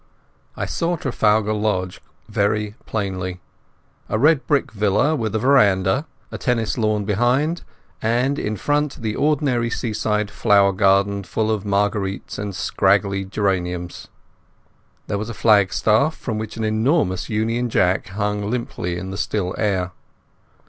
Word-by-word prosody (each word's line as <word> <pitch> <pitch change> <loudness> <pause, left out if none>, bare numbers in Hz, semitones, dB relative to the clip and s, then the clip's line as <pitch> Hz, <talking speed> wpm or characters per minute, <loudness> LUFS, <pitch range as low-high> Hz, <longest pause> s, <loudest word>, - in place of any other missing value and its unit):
I - - -2
saw 170 +1 -1
Trafalgar 110 -6 +1
Lodge 105 -4 -1 0.3
very 105 +1 0
plainly, 95 -4 -3 0.7
a - - 0
red 150 +4 +3
brick 145 -2 +1
villa 105 +8 +2
with 110 -5 -2
a - - +3
veranda, 110 - +3 0.2
a - - -6
tennis 115 -3 0
lawn 110 -3 0
behind, 125 - +1 0.4
and 125 +5 +1
in 105 0 -2
front 145 +4 0
the 110 -1 -1
ordinary 140 -5 +1
seaside 105 -2 -1
flower 100 -1 +4
garden 100 +1 +2
full 110 +4 -1
of 105 -2 -2
marguerites 100 -1 -1
and 100 -2 -4
scraggy 100 +2 +1
geraniums. 90 -3 -2 1.0
There 100 - -2
was 110 +2 -4
a 115 - -6
flagstaff 110 - +3
from 110 -4 -4
which 110 0 -6
an 110 - -2
enormous 110 - +1
Union 115 +3 0
Jack 90 -3 +1
hung 105 +1 -2
limply 110 -7 -3
in 95 +2 -6
the 95 - -5
still 95 -3 -1
air. 95 -4 0
105 Hz, 135 wpm, -21 LUFS, 100-120 Hz, 1.0 s, flower